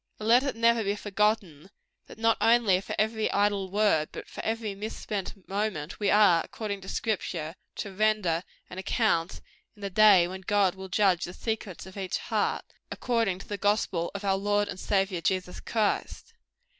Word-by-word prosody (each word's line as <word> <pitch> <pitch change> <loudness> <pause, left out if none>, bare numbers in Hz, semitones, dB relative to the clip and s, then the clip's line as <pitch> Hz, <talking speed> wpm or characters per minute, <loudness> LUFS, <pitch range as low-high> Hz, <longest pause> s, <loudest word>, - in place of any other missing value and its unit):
And 215 - -5
let 240 +2 +6
it 275 -3 -2
never 230 0 +3
be 200 0 0
forgotten, 205 -5 -1 0.4
that - - -12
not 225 0 +3
only 225 -5 +4
for - - -5
every 220 0 0
idle 200 -1 +1
word, 200 -6 +2
but - - -8
for - - -8
every 225 -2 -2
misspent 200 -1 -6
moment, 195 -6 -3
we 205 -2 +1
are, 200 -5 +5
according 205 -3 -5
to 190 - -9
Scripture, 170 -7 -2 0.2
to 200 - -5
render 200 -5 +1 0.2
an 180 - -8
account 190 -4 0 0.3
in 205 - -14
the 200 - -3
day 195 -3 +6
when 190 +1 -7
God 195 -1 +2
will 190 0 -9
judge 185 -2 +2
the 175 - -8
secrets 220 -6 -4
of 190 +1 -12
each 190 -2 -2
heart, - - -1 0.2
according 230 -7 0
to 195 - -12
the 205 -1 -5
gospel 200 -4 0
of 200 - -5
our 195 -1 +2
Lord 205 +1 +1
and 190 -2 -6
Saviour 195 -3 0
Jesus 180 +1 -1
Christ. 225 - -2
200 Hz, 180 wpm, -28 LUFS, 185-215 Hz, 0.4 s, let